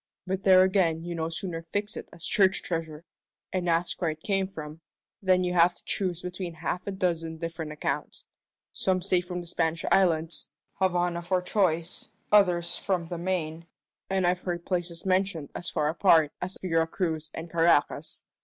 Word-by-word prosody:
But 190 Hz, 0 st, -2 dB
there 185 Hz, -1 st, +7 dB
again 180 Hz, -4 st, +2 dB
you 175 Hz, 0 st, -4 dB
no 165 Hz, -1 st, -2 dB
sooner 165 Hz, 0 st, -3 dB
fix 205 Hz, +6 st, -3 dB
it -, -, -7 dB
as 170 Hz, 0 st, -8 dB
church 195 Hz, -4 st, +3 dB
treasure, 165 Hz, -1 st, -4 dB, 0.5 s
and 180 Hz, -2 st, 0 dB
ask 170 Hz, +3 st, 0 dB
where 170 Hz, -, +2 dB
it 155 Hz, 0 st, -6 dB
came 195 Hz, -2 st, +1 dB
from, 155 Hz, -3 st, -8 dB, 0.4 s
than 185 Hz, -2 st, +3 dB
you 180 Hz, 0 st, 0 dB
have 175 Hz, 0 st, +5 dB
to -, -, -18 dB
choose 180 Hz, -4 st, -2 dB
between 180 Hz, -1 st, -5 dB
half 180 Hz, +4 st, -3 dB
a -, -, -1 dB
dozen 170 Hz, -4 st, -1 dB
different 165 Hz, -1 st, -5 dB
accounts. 150 Hz, -, -3 dB, 0.5 s
Some 185 Hz, -1 st, 0 dB
say 185 Hz, -1 st, +2 dB
from 180 Hz, 0 st, -5 dB
the -, -, -10 dB
Spanish 165 Hz, -1 st, -1 dB
islands 165 Hz, -3 st, +2 dB, 0.3 s
Havana 175 Hz, -2 st, +1 dB
for 180 Hz, +2 st, +1 dB
choice; 175 Hz, -4 st, 0 dB, 0.2 s
others 175 Hz, -4 st, +4 dB
from 180 Hz, -4 st, -1 dB
the 175 Hz, -, -4 dB
Main, 170 Hz, -2 st, -2 dB, 0.4 s
and 190 Hz, -1 st, +1 dB
I've 180 Hz, +1 st, +1 dB
heard 175 Hz, -2 st, -3 dB
places 175 Hz, -2 st, -2 dB
mentioned 185 Hz, -5 st, +1 dB
as 175 Hz, -, -5 dB
far 150 Hz, -3 st, 0 dB
apart 160 Hz, -3 st, +4 dB
us 185 Hz, +1 st, -4 dB
Vera 165 Hz, -3 st, +2 dB
Cruz 160 Hz, -3 st, -2 dB
and 165 Hz, -, -5 dB
Caracas. 165 Hz, -3 st, +2 dB
175 Hz, 175 wpm, -28 LUFS, 165-185 Hz, 0.5 s, there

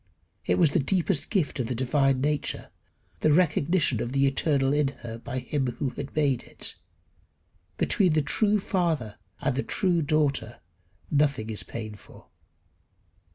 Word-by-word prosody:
It -, -, +2 dB
was 165 Hz, -5 st, +4 dB
the 175 Hz, -, +2 dB
deepest 165 Hz, +1 st, 0 dB
gift 175 Hz, -9 st, 0 dB
of 120 Hz, -, -1 dB
the 125 Hz, -, -2 dB
divine 130 Hz, +1 st, +2 dB
nature 150 Hz, +1 st, -2 dB, 0.5 s
the 155 Hz, -, +3 dB
recognition 155 Hz, -5 st, +2 dB
of 120 Hz, +2 st, -3 dB
the 140 Hz, 0 st, +3 dB
eternal 135 Hz, 0 st, +2 dB
in 145 Hz, -1 st, +2 dB, 0.2 s
her 115 Hz, 0 st, -6 dB
by 125 Hz, +2 st, -5 dB
him 135 Hz, +1 st, -1 dB
who 130 Hz, +3 st, -2 dB
had 140 Hz, +1 st, -7 dB
made 140 Hz, -5 st, +2 dB
it. -, -, -4 dB, 1.0 s
Between 185 Hz, -5 st, +2 dB
the 155 Hz, -1 st, +2 dB
true 210 Hz, +7 st, +2 dB
father 160 Hz, -, -1 dB, 0.2 s
and 140 Hz, -2 st, 0 dB
the 140 Hz, -, +1 dB
true 180 Hz, 0 st, +1 dB
daughter 140 Hz, -6 st, 0 dB, 0.5 s
nothing 140 Hz, -7 st, +1 dB
is 105 Hz, -, -4 dB
painful. 110 Hz, -3 st, -9 dB
140 Hz, 150 wpm, -27 LUFS, 130-155 Hz, 1.0 s, was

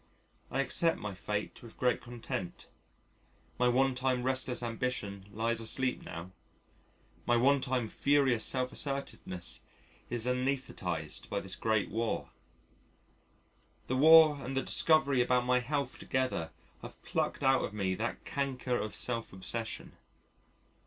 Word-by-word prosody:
I 135 Hz, -, 0 dB
accept 165 Hz, +4 st, +1 dB
my 105 Hz, -1 st, -5 dB
fate 105 Hz, +2 st, -4 dB
with 115 Hz, -2 st, -13 dB
great 125 Hz, -1 st, +1 dB
content, 115 Hz, -6 st, -6 dB, 0.9 s
my 125 Hz, -, +4 dB
one 130 Hz, +2 st, +3 dB
time 125 Hz, -1 st, 0 dB
restless 130 Hz, -1 st, 0 dB
ambition 115 Hz, -4 st, -3 dB
lies 115 Hz, +2 st, 0 dB
asleep 125 Hz, +3 st, +1 dB
now, 85 Hz, +2 st, -8 dB, 1.0 s
my 120 Hz, -, +4 dB
one 135 Hz, +3 st, +4 dB
time, 125 Hz, -3 st, -1 dB
furious 135 Hz, -1 st, +2 dB
self 130 Hz, 0 st, +1 dB
assertiveness 135 Hz, -10 st, -3 dB, 0.5 s
is 120 Hz, -1 st, -1 dB
anæsthetised 125 Hz, -, -2 dB
by -, -, -1 dB
this -, -, -3 dB
great 110 Hz, -2 st, 0 dB
War; 115 Hz, 0 st, -2 dB, 1.5 s
the 130 Hz, -, -1 dB
War 155 Hz, 0 st, +7 dB
and 135 Hz, +2 st, -4 dB
the 135 Hz, -, +1 dB
discovery 140 Hz, -5 st, +3 dB
about 125 Hz, 0 st, +2 dB
my 125 Hz, 0 st, +3 dB
health 140 Hz, +1 st, -2 dB
together 130 Hz, -11 st, -1 dB, 0.3 s
have -, -, -10 dB
plucked -, -, -2 dB
out 135 Hz, 0 st, +4 dB
of -, -, -3 dB
me 100 Hz, -3 st, -1 dB
that 110 Hz, +5 st, -4 dB
canker 130 Hz, -3 st, -1 dB
of 105 Hz, -, -4 dB
self 115 Hz, -2 st, 0 dB
obsession. 110 Hz, +4 st, -4 dB
125 Hz, 130 wpm, -32 LUFS, 110-135 Hz, 1.5 s, War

